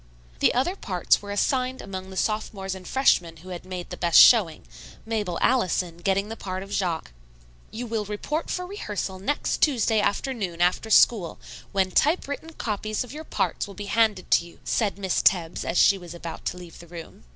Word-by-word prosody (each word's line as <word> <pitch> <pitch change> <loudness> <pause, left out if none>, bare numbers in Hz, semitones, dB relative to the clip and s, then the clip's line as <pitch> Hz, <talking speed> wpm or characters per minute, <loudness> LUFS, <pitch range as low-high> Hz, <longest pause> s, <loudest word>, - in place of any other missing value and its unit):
The - - +3
other 305 +10 +1
parts 180 - +1
were 205 - -10
assigned 255 +5 0
among 190 -1 -7
the 190 - -9
sophomores 205 -3 -2
and 185 -2 -9
freshmen 175 -11 +2
who 180 +4 -13
had 180 -2 -6
made 180 -1 -7
the - - -5
best 170 -2 +5
showing, 195 -10 +6 0.4
Mabel 210 -6 -2
Allison 180 -8 +1
getting 195 +3 0
the 225 - -6
part 185 -3 -5
of 195 - -12
Jaques. 175 - -2 0.6
"You 240 +3 -6
will 220 -2 -2
report 255 +10 -3
for 360 - -2
rehearsal 210 - -5
next 250 +10 -1
Tuesday 230 -6 +3
afternoon 205 -5 -2
after 180 +5 +1
school, 210 -5 +4 0.3
when 190 -2 +1
typewritten 305 - 0
copies 215 -2 -3
of 250 - -11
your 310 +1 -7
parts 190 - -1
will 200 - -11
be 205 - -6
handed 220 -5 +2 0.2
you," 170 0 -14
said 205 -4 0
Miss 190 -2 0
Tebbs, 175 -3 +2
as 170 - -2
she 195 - +5
was 175 -1 -10
about 170 -1 -8
to - - -2
leave 175 -2 -11
the 170 - -12
room. 165 - -11
200 Hz, 185 wpm, -25 LUFS, 180-225 Hz, 0.6 s, showing